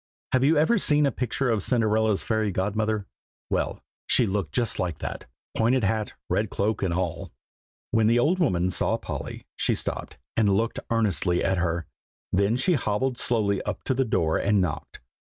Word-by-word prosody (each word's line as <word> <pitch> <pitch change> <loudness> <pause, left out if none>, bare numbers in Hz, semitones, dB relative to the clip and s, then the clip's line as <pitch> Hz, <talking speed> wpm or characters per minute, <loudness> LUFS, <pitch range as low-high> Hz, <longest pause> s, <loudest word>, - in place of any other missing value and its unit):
Have 130 0 +3
you 150 +3 +4
ever 200 +10 +3
seen 150 -4 +4
a 140 - +2
picture 125 +1 -1
of 110 -3 +1
Cinderella's 110 -2 +2
fairy 110 -2 0
godmother? 105 +2 -1 0.5
well, - - -1 0.2
she 125 - +4
looked 95 -6 -2
just 120 +1 -1
like 85 -5 -1
that, - - -6 0.3
pointed 120 +2 +2
hat, 105 +1 0
red - - 0
cloak, 105 +1 -1
and 95 - 0
all. 90 -2 -3 0.6
When 110 -1 +3
the 115 +1 +4
old 160 +10 +2
woman 90 - +1
saw - - +1
Polly, - - -6
she - - +1
stopped, - - -5 0.2
and 100 -3 +3
looked 115 +1 -1
earnestly 100 -6 +1
at 95 -2 +1
her; 85 -1 -1 0.5
then 100 +5 +2
she 180 +8 +2
hobbled 125 -1 -1
slowly 105 -5 0
up 105 -2 -5
to - - 0
the 135 +1 +2
door 85 -9 +1
and 100 0 +2
knocked. 85 -5 -3
110 Hz, 175 wpm, -26 LUFS, 95-120 Hz, 0.6 s, you